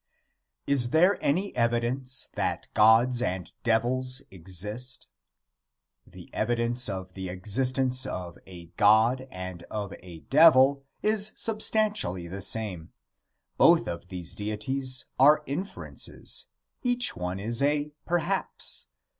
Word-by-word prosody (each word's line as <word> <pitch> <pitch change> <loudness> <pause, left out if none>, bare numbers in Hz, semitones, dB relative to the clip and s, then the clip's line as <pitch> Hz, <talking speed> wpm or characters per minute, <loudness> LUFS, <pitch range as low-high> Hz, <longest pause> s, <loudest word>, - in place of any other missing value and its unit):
Is 130 -4 +2
there 180 +8 +3
any 185 +8 -1
evidence 120 +2 0
that - - -2
gods 115 +3 +4
and 90 -7 -3
devils 125 +3 +1
exist? 105 +8 -4 1.0
The - - -14
evidence 120 0 -1
of 95 -1 -6
the 95 -1 -6
existence 130 +7 0
of 90 -2 -7
a 85 -3 -12
god 115 +5 +3
and 90 -3 -8
of 105 -2 -5
a 85 -3 -12
devil 140 -3 +5 0.2
is 215 0 +4
substantially 215 - +1
the 95 +3 -7
same. 95 -5 -1 0.7
Both - - +5
of 85 0 -6
these 90 -2 -6
deities 130 +6 -2
are 150 +3 +5
inferences; 175 +9 -5 0.3
each 245 -1 +2
one 90 +1 -4
is 115 +5 -1
a 145 +1 0 0.2
perhaps. 175 - -1
120 Hz, 115 wpm, -27 LUFS, 95-140 Hz, 1.0 s, devil